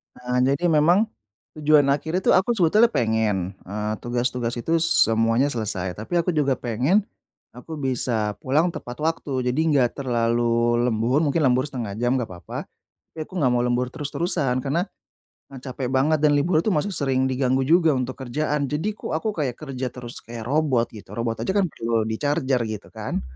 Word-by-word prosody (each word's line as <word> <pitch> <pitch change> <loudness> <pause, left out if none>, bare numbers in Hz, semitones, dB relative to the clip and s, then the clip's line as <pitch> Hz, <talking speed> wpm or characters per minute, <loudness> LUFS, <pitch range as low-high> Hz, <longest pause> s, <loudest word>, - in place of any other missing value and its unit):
Heeh. 125 0 -2
Jadi, 160 +6 -2
memang 175 +8 +4 0.5
tujuan 150 -2 +4
akhir 160 +6 0
itu - - +2
aku 190 +6 +3
sebetulnya 210 +5 +4
pengen, 105 -5 0
eee, 105 +2 -3
tugas-tugas 120 0 -1
itu 160 +8 0
semuanya 115 - +4
selesai. 100 -7 -3
Tapi 110 +10 -7
aku 175 - -3
juga 145 -4 +1
pengen 125 - +1 0.5
aku 140 +6 -9
bisa 115 -6 -1
pulang 150 +9 +1
tepat 125 -5 -8
waktu 150 -5 -1
jadi 125 - -1
nggak 130 -5 +3
terlalu 120 -2 +1
lembur, 120 +4 +1
mungkin 150 +3 +1
lembur 130 -1 +3
0.5 115 -8 -5
jam 120 +2 +1
nggak 125 -5 -1
papa. 90 -1 -8 0.4
Tapi - - -10
aku - - -18
nggak 130 -6 +2
mau 120 - +2
lembur 125 +1 0
terus-terusan. 150 -3 -1
Karena 150 +6 +1 0.7
e 135 - -11
capek 130 -1 -4
banget 135 +4 +2
dan 150 -1 +4
libur 155 +3 +2
itu 215 - -2
masih 155 +7 0
sering 135 -4 0
diganggu 130 0 +1
juga 160 +1 +4
untuk 130 0 -2
kerjaan. 145 +2 -2
Jadi, 160 +9 -2
kok 210 - -6
aku 215 +7 -2
kayak 140 - -2
kerja 135 -4 -5
terus 120 -1 -7
kayak 115 -1 -8
robot, 135 -2 +1
gitu. 105 -2 -11
Robot 115 -1 -2
aja 190 - +1
kan 200 - +4
perlu 115 -3 -1
di 110 0 -3
charger, 140 -3 +1
gitu 110 -2 -6
kan. - - -4
130 Hz, 175 wpm, -23 LUFS, 120-150 Hz, 0.7 s, memang